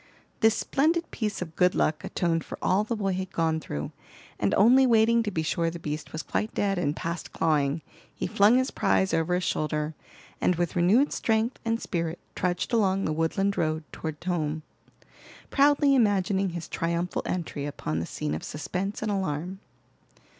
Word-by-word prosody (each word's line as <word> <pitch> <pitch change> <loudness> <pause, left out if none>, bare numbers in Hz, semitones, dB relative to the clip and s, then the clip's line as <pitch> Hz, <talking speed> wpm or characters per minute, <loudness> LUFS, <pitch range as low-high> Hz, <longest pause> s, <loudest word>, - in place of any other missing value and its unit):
This 220 -1 +4
splendid 325 +4 +1
piece 210 -5 -2
of 160 -2 -12
good 180 0 +3
luck 155 0 +1
atoned 165 -2 0
for - - -8
all 190 +3 +2
the 230 +2 -2
boy 195 -3 -1
had 185 0 -4
gone 160 -1 +1
through, 75 - -5 0.5
and 100 -1 +1
only 255 +6 +6
waiting 230 0 +4
to 220 - -1
be 160 -5 -2
sure 165 +1 0
the 170 - -6
beast 150 -1 -5
was 155 -1 -4
quite 215 - -2
dead 195 -2 +1
and 150 -3 0
past 170 +1 -4
clawing, 150 -1 +1 0.3
he - - -4
flung 210 +5 +4
his 260 +1 +1
prize 190 -2 +1
over 165 +2 +1
his 180 - -1
shoulder, 150 -1 -1 0.5
and 180 - +3
with 175 0 -1
renewed 200 +11 +4
strength 225 +2 0
and 230 -1 0
spirit 170 -4 -2 0.2
trudged 180 +5 -1
along 195 -4 +2
the 155 - 0
woodland 195 +5 0
road 155 0 0
toward 160 -1 -5
home, 160 -4 -1 0.9
proudly 285 0 +4
imagining 200 -5 +2
his 170 -1 -6
triumphal 170 +1 -1
entry 155 -5 -3
upon 80 - -3
the 85 - -3
scene 75 - -3
of 80 - -4
suspense 185 +8 -4
and 215 - -1
alarm. 185 -1 -2
180 Hz, 175 wpm, -27 LUFS, 160-210 Hz, 0.9 s, only